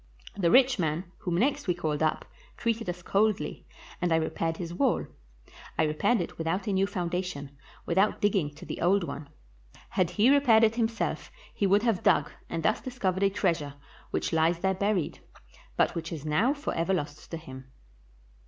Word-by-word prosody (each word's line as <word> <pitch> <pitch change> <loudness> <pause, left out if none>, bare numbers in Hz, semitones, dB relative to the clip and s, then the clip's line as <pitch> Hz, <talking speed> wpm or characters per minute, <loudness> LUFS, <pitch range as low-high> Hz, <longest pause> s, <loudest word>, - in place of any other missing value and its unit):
The 185 -4 +2
rich 255 +4 +5
man, 160 0 0 0.2
whom 175 -2 -2
next 265 +5 +1
we 180 - +2
called 155 -3 -2
up, 155 -1 +1 0.3
treated 230 -3 -1
us 175 0 -5
coldly, 210 +2 0 0.3
and 175 -1 +1
I - - +5
repaired 165 0 -1
his 170 -1 -5
wall. 255 +6 +1 0.7
I - - +3
repaired 155 +10 +2
it 170 - -6
without 165 +4 -1
a 205 - -1
new 190 +1 +2
foundation, 175 -6 -3 0.3
without 190 +5 +2
digging 195 -7 +2
to 155 - -11
the - - -6
old 190 +3 +3
one. 145 -3 -6 0.6
Had 185 -3 +1
he 215 +8 +4
repaired 250 -6 +5
it 220 0 +4
himself 230 -1 -2 0.2
he 200 - +1
would 200 +3 +4
have 225 -7 +1
dug, - - +3 0.2
and 165 -1 -3
thus 215 - +2
discovered 195 -8 -2
a 200 - +4
treasure 170 -7 -1 0.3
which - - -2
Ues 165 +1 +3
there 190 +2 +1
buried, 195 -3 -1 0.6
but - - +3
which 165 -1 -5
is 155 -3 -6
now 155 - +2
forever 190 - -1
lost 150 -2 -5
to 165 - -4
him. 130 -4 -11
180 Hz, 180 wpm, -28 LUFS, 165-210 Hz, 0.7 s, rich